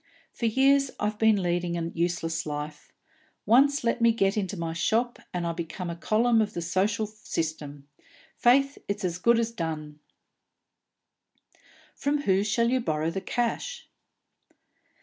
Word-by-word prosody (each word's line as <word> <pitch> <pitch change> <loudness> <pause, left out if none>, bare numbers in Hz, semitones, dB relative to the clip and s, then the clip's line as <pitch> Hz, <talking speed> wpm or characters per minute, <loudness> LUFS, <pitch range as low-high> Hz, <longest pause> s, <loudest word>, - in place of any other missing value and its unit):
For 235 - -1
years 275 +4 +3
I've 210 0 -2
been 220 -3 +4
leading 175 0 -1
a 165 0 -3
useless 165 -1 -1
life; 150 0 -6 0.5
once 275 +6 +4
let 235 +1 0
me 230 0 +6
get 195 -3 +1
into 200 -2 -2
my 165 -1 -3
shop, 230 +8 0
and 175 -1 -3
I 170 - 0
become 170 +1 -5
a - - -5
column 225 +6 +2
of 210 -1 -2
the 170 - -2
social 200 +5 0
system. 155 -9 -5 0.5
Faith, 275 +3 +3
it's 200 -1 -2
as 175 0 -2
good 235 +4 +4
as 230 0 0
done!" 155 -7 -5 1.9
"From 290 +1 -1
whom 190 -4 +3
shall 235 +3 +1
you 260 - +2
borrow 160 -6 -1
the 190 - -4
cash?" 240 - -3
200 Hz, 150 wpm, -27 LUFS, 170-235 Hz, 1.9 s, me